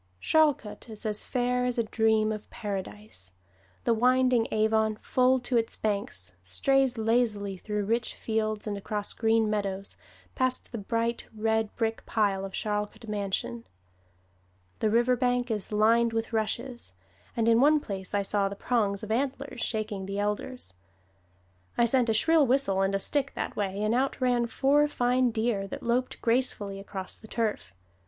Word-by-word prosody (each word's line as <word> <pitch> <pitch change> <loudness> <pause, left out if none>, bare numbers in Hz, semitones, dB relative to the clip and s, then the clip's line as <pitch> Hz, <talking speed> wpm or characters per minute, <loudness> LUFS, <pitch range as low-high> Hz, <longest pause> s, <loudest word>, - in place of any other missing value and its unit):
Charlcote 290 - +1
is 220 -1 -9
as 210 -1 0
fair 250 0 0
as 250 -1 +1
a 235 - +2
dream 220 -1 +2
of 215 -1 -6
Paradise. 205 - -6 0.5
The 235 - +3
winding 250 0 +3
Avon, 220 0 +2
full 255 +4 +2
to 245 0 0
its 225 -1 0
banks, 200 - -3
strays 260 - +1
lazily 220 -3 +1
through 210 +2 -3
rich 230 +3 -1
fields 215 -1 -2
and 210 -2 -2
across 205 +1 -2
green 225 -1 +2
meadows, 200 -2 -2 0.4
past 255 0 -1
the 235 - -4
bright 230 +3 -2
red 220 0 0
brick 225 -1 -1
pile 200 -3 +1
of 195 - -7
Charlcote 210 +2 -3
Mansion. 210 +3 -3 1.1
The 215 - +2
river 240 +3 +3
bank 245 0 0
is 210 -2 -1
lined 225 +2 +3
with 225 +1 -2
rushes, 230 - -3 0.4
and 230 -1 +2
in 230 +1 +5
one 300 +2 +5
place 195 -7 -4
I 200 - +2
saw 200 0 +1
the 200 - -6
prongs 205 -3 0
of 215 - -5
antlers 265 +1 -2
shaking 215 -4 -2
the 195 0 -4
elders. 210 - -3 1.0
I 235 - +5
sent 245 0 +2
a - - +3
shrill 315 +4 +4
whistle 245 -7 +2
and 195 0 +1
a - - +1
stick 275 +6 +1
that - - -3
way, 200 0 -2
and 215 +1 +1
out 265 +3 0
ran 245 -2 +2
four 285 +4 +3
fine 250 -2 +2
deer 220 -3 -1
that - - -7
loped 245 +2 0
gracefully 230 -5 0
across 195 -1 -7
the 220 - -13
turf. 215 - -2
220 Hz, 160 wpm, -28 LUFS, 205-245 Hz, 1.1 s, in